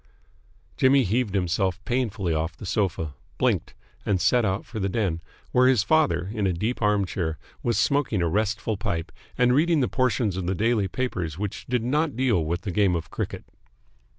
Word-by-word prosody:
Jimmy 135 +1 +5
heaved 110 0 0
himself 95 0 0
painfully 110 -8 -1
off 80 +2 -2
the - - -8
sofa, 90 -7 -1 0.2
blinked, - - 0 0.3
and 100 -3 +1
set 115 +8 +3
out 95 0 -1
for 110 - -6
the 100 0 0
den, 95 -6 -1 0.3
where 125 0 +5
his 125 -5 +4
father, 140 - +2
in 105 -4 0
a 95 - +1
deep 110 +9 -2
arm 105 -2 +2
chair, 85 -4 -3 0.2
was 120 -1 0
smoking 140 -10 +1
a - - +2
restful 105 +3 -1
pipe 100 -6 -3 0.3
and 125 0 +4
reading 160 +3 +3
the 130 - +2
portions 120 -6 0
of 90 -2 -3
the 95 - 0
daily 110 0 +1
papers 90 -9 -3
which 105 +1 -5
did 125 -2 0
not 145 +3 0
deal 120 -9 +2
with 85 +3 -2
the 95 - -4
game 95 -1 +2
of 85 - -5
cricket. - - -4
105 Hz, 185 wpm, -25 LUFS, 90-125 Hz, 0.3 s, Jimmy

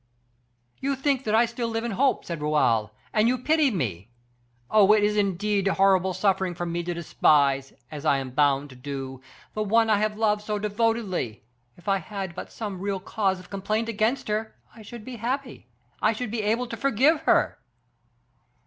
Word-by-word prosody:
"You 275 +1 -1
think 270 -1 0
that 215 0 +1
I 235 +2 +5
still 235 0 -3
live 225 0 -2
in 235 - -2
hope," 260 +6 +1
said 170 -3 -5
Raoul, 115 -8 +2 0.2
"and 215 +1 +3
you 255 +2 +2
pity 305 +3 +2
me. 115 - -3 0.6
Oh, 210 -1 +6
it 215 -1 +3
is 210 0 +2
indeed 200 0 +1
horrible 190 -1 +3
suffering 190 -1 +1
for 175 - -3
me 170 0 -2
to 175 0 -4
despise, 140 -5 +2 0.2
as 150 -2 -7
I 145 -3 +3
am 135 -1 -5
bound 140 0 +2
to - - -12
do, 135 0 -6 0.3
the 215 - -2
one 225 +2 +3
I 205 - +4
have 210 0 -1
loved 210 -1 +2
so 210 0 -2
devotedly. 205 - -1 0.3
If 175 - -19
I 195 -1 +3
had 190 0 -6
but - - -8
some 205 -5 -5
real 200 -1 -2
cause 190 -1 -1
of 185 - -15
complaint 215 +3 -1
against 230 +4 0
her, 215 +1 -2 0.2
I 225 - -12
should 215 +1 -10
be 255 -2 -7
happy, 245 - -4 0.3
I 215 - +3
should 225 0 -4
be 230 -1 -1
able 225 +4 0
to 235 - -6
forgive 275 +5 +3
her." - - +3
205 Hz, 190 wpm, -25 LUFS, 175-230 Hz, 0.6 s, Oh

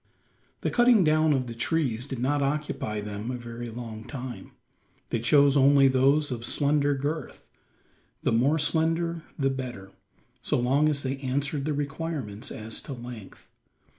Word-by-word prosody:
The - - -1
cutting 240 -4 +5
down 155 0 +3
of 135 -3 +1
the 120 - -6
trees 125 -1 -1
did 135 - -5
not 140 +4 0
occupy 140 -7 -2
them 105 +2 -5
a 125 - -3
very 120 0 -7
long 115 -1 -7
time. 125 0 -7 0.6
They 115 - 0
chose 140 +4 +4
only 140 0 +6
those 135 +3 +3
of 115 -2 -4
slender 145 +2 +2
girth 145 +2 -4 0.8
the - - +2
more 130 +7 +3
slender 165 +2 0 0.2
the 135 -3 +1
better, 125 -8 -6 0.5
so - - 0
long 135 +5 +3
as 140 -2 -1
they 135 0 -2
answered 140 +1 -2
the 155 - 0
requirements 140 -7 -4
as 110 0 -3
to 140 - -7
length. 120 -4 -10
135 Hz, 155 wpm, -27 LUFS, 120-150 Hz, 0.8 s, only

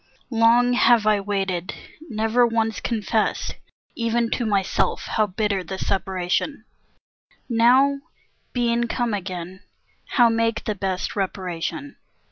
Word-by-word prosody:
Long 235 +2 +4
have 240 -3 +4
I 215 -1 +4
waited, 195 -3 -2 0.3
never 225 +2 +2
once 225 -2 -1
confessed, 220 -1 -1 0.4
Even 230 0 0
to 240 - -1
myself, 200 -3 0
how 215 -1 +1
bitter 200 -1 -1
the 190 +2 -6
separation; 190 - -2 0.8
Now, 255 +4 +4 0.5
being 240 -1 +1
come 240 -2 -1
again, 185 -2 -5 0.5
how 240 -3 +6
make 230 0 0
the 215 - -1
best 190 -2 -3
Reparation? 190 - -4
220 Hz, 110 wpm, -23 LUFS, 195-235 Hz, 0.8 s, how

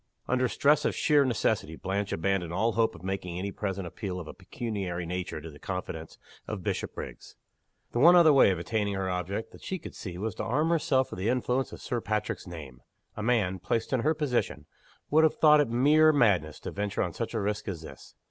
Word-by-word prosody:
Under 125 0 +2
stress 150 +4 +3
of - - 0
sheer 150 -2 +4
necessity 110 -7 0
Blanche 100 +3 -2
abandoned 90 0 0
all 110 +6 +1
hope 115 0 +1
of - - -13
making 95 -2 -3
any 100 +2 -3
present 95 -2 -3
appeal 90 +1 -5
of 85 - -8
a - - -7
pecuniary 95 -7 -4
nature 90 -1 -4
to 80 +1 -9
the 75 - -14
confidence 85 -4 -5 0.3
of - - -5
Bishopriggs. - - -5 0.6
The 120 - -1
one 170 +6 +8
other 165 -4 +7
way 135 - +6
of 95 - 0
attaining 100 +3 -1
her 95 -1 -2
object 90 +4 -3
that - - -15
she 190 - -3
could - - -10
see 90 -4 -7
was 105 +2 -3
to - - -5
arm 150 +8 +1
herself 145 -5 +2
with - - -6
the 100 +5 0
influence 125 +1 0
of - - -10
Sir 120 -2 -2
Patrick's 105 -2 -2
name. 75 -8 -9 0.3
A - - -5
man, 105 -5 +1
placed 115 +8 -2
in 130 - +3
her 155 +7 +1
position, 145 -6 -1 0.5
would 155 +2 +5
have 160 - +3
thought 150 -1 +6
it 145 - 0
mere 150 +6 +5
madness 100 - +2
to - - -5
venture 100 0 -1
on 90 -4 -3
such 115 0 -4
a - - +1
risk 105 +1 -2
as 85 -5 -4
this. - - -12
105 Hz, 215 wpm, -28 LUFS, 90-125 Hz, 0.6 s, one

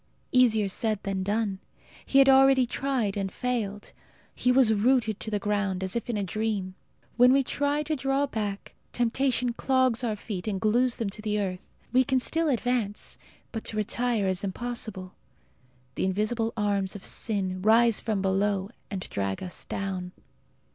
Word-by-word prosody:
Easier 225 -5 +4
said 215 +2 0
than 195 -1 -2
done. 205 0 -1 0.5
He 275 - +2
had 275 0 +7
already 270 -1 +6
tried 245 -5 -1
and 195 -2 -2
failed. 215 -5 -3 0.4
He 250 - +1
was 250 -3 +5
rooted 220 -1 +2
to - - -5
the 210 - 0
ground, 200 -2 -1
as 190 +2 -2
if 235 - -3
in 230 - -1
a 205 - -1
dream. 200 -1 -2 0.4
When 250 +1 +7
we 275 +1 +4
try 285 +3 0
to 310 +1 -1
draw 270 +1 0
back, 210 -6 -4 0.2
temptation 245 0 +1
clogs 255 -1 +1
our 225 -3 0
feet 205 -2 -6
and 200 -3 -1
glues 240 +4 +2
them 215 -4 -2
to 215 - -7
the 210 -1 -1
earth. 185 -2 -4 0.2
We 255 +1 +5
can 260 0 +1
still 325 +5 +1
advance, 245 -5 0 0.3
but 225 - -5
to 215 - -3
retire 225 0 0
is 185 0 -1
impossible. 200 -2 -4 0.8
The - - -1
invisible 215 +4 0
arms 200 -2 0
of 200 - -8
sin 190 -4 -2
rise 225 +2 +4
from 210 -3 -1
below 195 +1 0 0.2
and 195 -2 -4
drag 100 - -3
us 180 - -4
down. 185 -2 -4
215 Hz, 170 wpm, -27 LUFS, 195-250 Hz, 0.8 s, had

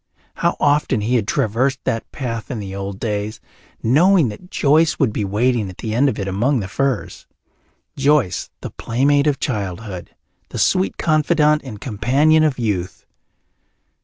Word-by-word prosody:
How - - 0
often 145 -5 +2
he 115 +4 -1
had 115 -5 +1
traversed 125 +6 0
that 115 -3 -3
path 115 -4 -5
in 125 - -4
the 100 -2 -6
old 100 0 -5
days, 105 -1 -3 0.4
knowing 160 - +4
that 110 +13 -10
Joyce 155 +1 +3
would 130 -7 +1
be 105 - -1
waiting 110 +1 0
at 90 - -11
the 110 -2 -4
end 135 +5 +3
of 110 - -4
it 100 - -3
among 120 +8 +1
the 95 - -4
firs 135 +2 -2 0.7
Joyce, 135 -10 +1
the - - -6
playmate 140 +5 +1
of 145 -2 +1
childhood, 100 -5 -4 0.3
the - - -7
sweet 185 0 +1
confidante 155 -1 +2
and 105 -5 -8
companion 140 +8 +2
of 150 -4 +1
youth! 100 -7 -3
120 Hz, 160 wpm, -20 LUFS, 105-145 Hz, 0.7 s, knowing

